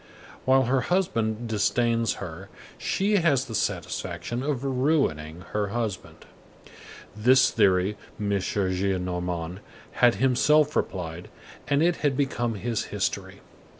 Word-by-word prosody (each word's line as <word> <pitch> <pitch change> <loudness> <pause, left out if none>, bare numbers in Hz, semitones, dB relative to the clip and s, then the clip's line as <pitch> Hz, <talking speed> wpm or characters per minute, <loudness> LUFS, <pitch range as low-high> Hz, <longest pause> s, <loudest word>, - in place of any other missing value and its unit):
While 130 0 +5
her 130 +1 +1
husband 115 - 0
disdains 115 +2 +1
her, 95 +1 -8 0.3
she 205 +2 +1
has 145 -7 +2
the 115 - -8
satisfaction 120 +2 -3
of 140 -2 -2
ruining 130 - 0
her 105 -1 0
husband." 110 -3 -4 0.9
This 125 +5 +5
theory 95 -1 +2 0.2
M. 105 -1 -2
Gillenormand 90 -2 -2 0.3
had 120 -1 +4
himself 145 +4 +3
applied, 85 -2 -3 0.4
and 145 +2 +2
it 175 0 +2
had 140 -3 0
become 120 -5 -1
his 115 +2 -2
history. - - -3
115 Hz, 115 wpm, -26 LUFS, 95-135 Hz, 0.9 s, While